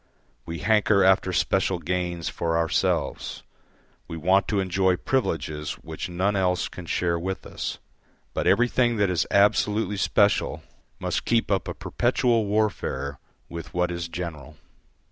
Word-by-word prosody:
We 85 0 -4
hanker 105 -2 +3
after 95 0 +4
special 95 +1 +1
gains 85 0 -2
for 85 -1 -1
ourselves, 80 -1 -1 0.6
we 80 - -6
want 95 +5 +3
to 105 - 0
enjoy 95 0 +2
privileges 80 - -2
which 80 +3 -7
none 95 +4 0
else 90 -2 +1
can 90 -2 -10
share 85 0 0
with 95 +2 -4
us. - - -4 0.6
But - - -1
everything 120 0 +3
that 100 -2 +2
is 85 -2 0
absolutely 105 0 +2
special 100 +2 +2 0.3
must - - -2
keep 115 -2 +1
up 95 - +1
a - - -4
perpetual 115 -4 +1
warfare 100 -10 -1 0.3
with 85 0 -8
what 90 0 +1
is 85 -1 -3
general. 80 -4 -7
90 Hz, 140 wpm, -25 LUFS, 85-100 Hz, 0.6 s, after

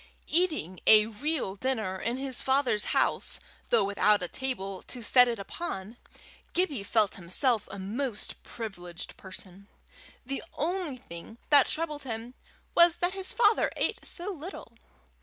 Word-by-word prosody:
Eating 310 - +2
a 215 -1 +8
real 250 0 -2
dinner 215 -5 -2
in 235 +2 -1
his 265 -2 -2
father's 265 -5 +2
house, - - +1 0.3
though 230 -3 +4
without 200 0 +3
a - - -1
table 195 -6 -4
to 245 -2 -7
set 250 +3 +7
it 235 -1 -1
upon, 200 - -6 0.6
Gibbie 325 - +1
felt 210 0 +1
himself 210 +6 +1
a - - -7
most 215 +4 -3
privileged 180 -6 -8
person. 190 +1 -11 0.6
The 275 +2 -3
only 335 -3 -2
thing 195 -2 -11
that 285 -2 +7
troubled 305 -2 -2
him 235 -1 -5 0.4
was 340 -1 +7
that 355 +1 0
his 385 +1 -1
father 455 -2 +3
ate - - -1
so 370 +3 -2
little. 320 -7 -9
240 Hz, 140 wpm, -29 LUFS, 200-295 Hz, 0.6 s, a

